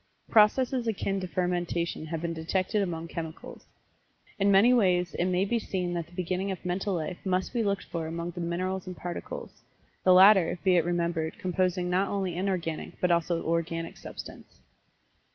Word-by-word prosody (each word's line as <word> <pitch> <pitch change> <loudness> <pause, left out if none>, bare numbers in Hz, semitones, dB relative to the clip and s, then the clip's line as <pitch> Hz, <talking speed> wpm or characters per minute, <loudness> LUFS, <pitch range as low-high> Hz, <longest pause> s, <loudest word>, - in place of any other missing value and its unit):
Processes 240 +3 +4
akin 195 -2 -1
to 185 - -4
fermentation 175 -2 -2
have 165 0 -4
been 170 0 -1
detected 185 +5 -1
among 165 -3 -3
chemicals. 160 -1 -8 0.7
In 200 0 +3
many 200 +5 +6
ways 180 -6 +2
it 175 - 0
may 185 +1 +1
be 235 +3 0
seen 180 -4 -3
that 170 -2 -3
the 175 - -18
beginning 185 +2 -2
of 190 -1 -5
Mental 190 +2 -1
Life 165 +2 -4
must 185 -1 -1
be 240 - +1
looked 200 -2 0
for 165 -2 -4
among 170 +1 -4
the 175 0 -6
Minerals 185 +2 -2
and 185 - -6
Particles 175 -1 -7 0.4
the 185 - +5
latter, 190 -1 +7
be 185 -1 +4
it 170 -2 +3
remembered, 170 -2 -1
composing 185 -3 0
not 185 +2 +1
only 190 -4 -2
inorganic, 180 -4 -3
but 180 - +2
also 170 0 +1
Organic 165 0 -2
Substance. - - -10
180 Hz, 170 wpm, -28 LUFS, 170-195 Hz, 0.7 s, latter